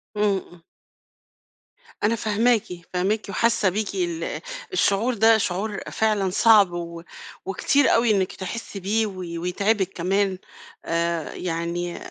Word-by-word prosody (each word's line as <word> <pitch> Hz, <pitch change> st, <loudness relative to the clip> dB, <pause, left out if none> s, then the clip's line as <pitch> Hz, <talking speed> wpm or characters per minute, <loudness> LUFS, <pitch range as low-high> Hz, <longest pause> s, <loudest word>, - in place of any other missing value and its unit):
امم. 195 Hz, -4 st, -1 dB, 1.4 s
أنا 225 Hz, +2 st, +3 dB
فاهماكِ، 220 Hz, +1 st, +2 dB, 0.3 s
فاهماكِ 200 Hz, +4 st, 0 dB
وحاسة 230 Hz, -1 st, +2 dB
بيكِ 205 Hz, +1 st, -3 dB
ال 170 Hz, -3 st, -2 dB, 0.3 s
الشعور 230 Hz, -, +2 dB
ده 225 Hz, +1 st, +5 dB
شعور 200 Hz, +1 st, -2 dB
فعلًا 210 Hz, -3 st, +1 dB
صعب 205 Hz, -2 st, +5 dB
و 170 Hz, -1 st, -6 dB, 0.4 s
وكتير 260 Hz, +8 st, +2 dB
أوي 230 Hz, -1 st, +4 dB
إنِك 190 Hz, -3 st, +1 dB
تحسي 195 Hz, +1 st, -6 dB
بيه 215 Hz, +4 st, +1 dB
و 195 Hz, -, -8 dB, 0.3 s
ويتعبِك 195 Hz, +2 st, 0 dB
كمان. 190 Hz, +2 st, 0 dB, 0.5 s
آآ، 170 Hz, -1 st, -1 dB
يعني 170 Hz, 0 st, -3 dB
195 Hz, 115 wpm, -24 LUFS, 180-220 Hz, 1.4 s, ده